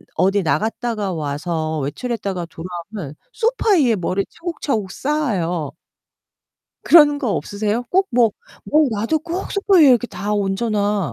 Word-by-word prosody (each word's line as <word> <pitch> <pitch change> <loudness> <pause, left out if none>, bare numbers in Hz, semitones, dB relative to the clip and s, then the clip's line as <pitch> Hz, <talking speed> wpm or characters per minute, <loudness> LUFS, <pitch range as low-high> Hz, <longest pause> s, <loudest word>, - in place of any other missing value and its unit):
어디 195 +1 +2
나갔다가 215 +2 -1
와서 155 +1 -3
외출했다가 195 - -3
돌아오면 170 -1 -8 0.2
소파 465 -2 0
위에 265 - +4
뭐를 190 +1 -1
차곡차곡 290 - -3
쌓아요. 185 - -1 1.1
그런 295 -3 +6
거 255 -6 -1
없으세요? 210 +3 -2
꼭 380 +1 +3
뭐 235 -2 +4 0.3
뭐 305 0 +3
와도 225 +8 0
꼭 345 +4 -5
소파 400 -1 +2
위에 300 -4 +8
이렇게 245 -1 +4
다 210 -3 -4
얹어놔. 205 -2 0
210 Hz, 290 characters per minute, -20 LUFS, 180-290 Hz, 1.1 s, 위에